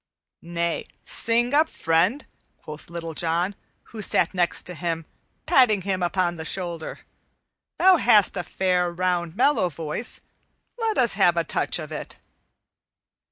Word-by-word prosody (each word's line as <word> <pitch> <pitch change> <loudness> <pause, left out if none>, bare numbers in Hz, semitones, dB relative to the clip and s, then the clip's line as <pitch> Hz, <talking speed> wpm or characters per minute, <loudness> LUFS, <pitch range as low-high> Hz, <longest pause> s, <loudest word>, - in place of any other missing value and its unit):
"Nay, 170 0 -3 0.2
sing 240 +3 +1
up, 310 +2 +4
friend," 170 - +1 0.4
quoth 155 +1 -10
Little 165 -1 -6
John, 170 +4 0 0.4
who 220 - -6
sat 200 - +2
next 175 -2 +1
to 180 - -6
him, 165 -1 -3 0.4
patting 240 - +4
him 190 -1 -2
upon 175 -1 0
the 160 - -5
shoulder. 170 -2 -4 0.8
"Thou 370 0 +6
hast 210 - +4
a - - -1
fair, 180 0 0
round, 175 -1 -1
mellow 260 -6 +3
voice; 165 +7 -4 0.6
let 450 -2 0
us - - +4
have - - +3
a - - +2
touch - - 0
of - - -7
it." - - -7
180 Hz, 140 wpm, -24 LUFS, 170-215 Hz, 0.8 s, Thou